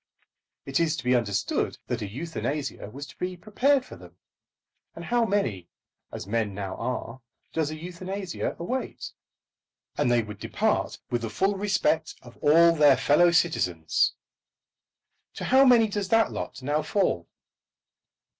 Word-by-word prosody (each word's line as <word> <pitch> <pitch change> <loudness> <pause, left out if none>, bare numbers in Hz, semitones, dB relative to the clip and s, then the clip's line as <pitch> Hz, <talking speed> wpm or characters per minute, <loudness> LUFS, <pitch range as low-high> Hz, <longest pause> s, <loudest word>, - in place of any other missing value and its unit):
It 135 +2 0
is 165 -1 +1
to - - -6
be 125 0 +2
understood 105 -5 0
that 120 -2 -3
a 105 - -3
euthanasia 145 0 -4
was 140 +6 -8
to 130 - -15
be 180 0 -4
prepared 255 +8 +1
for - - -11
them; - - -15 0.8
and - - -8
how 240 -1 +2
many, 115 - -1 0.4
as - - -6
men 105 -1 -1
now 95 -2 -4
are, 125 0 -4 0.3
does 160 -2 0
a 155 - -5
euthanasia 180 +3 -5
await? 250 +10 -4 0.9
And - - +2
they 120 -1 +3
would 105 -2 -9
depart - - -1
with 120 -1 0
the 115 - -3
full 195 - +1
respect 190 -5 0
of - - -14
all 165 +3 +6
their 145 -4 +5
fellow 175 +7 +4
citizens. 90 - +1 1.2
To - - -6
how 265 +2 +6
many 240 -3 +6
does 205 -2 -3
that 225 0 +3
lot - - -6
now 145 +3 +1
fall? 155 - 0
155 Hz, 150 wpm, -26 LUFS, 120-195 Hz, 1.2 s, all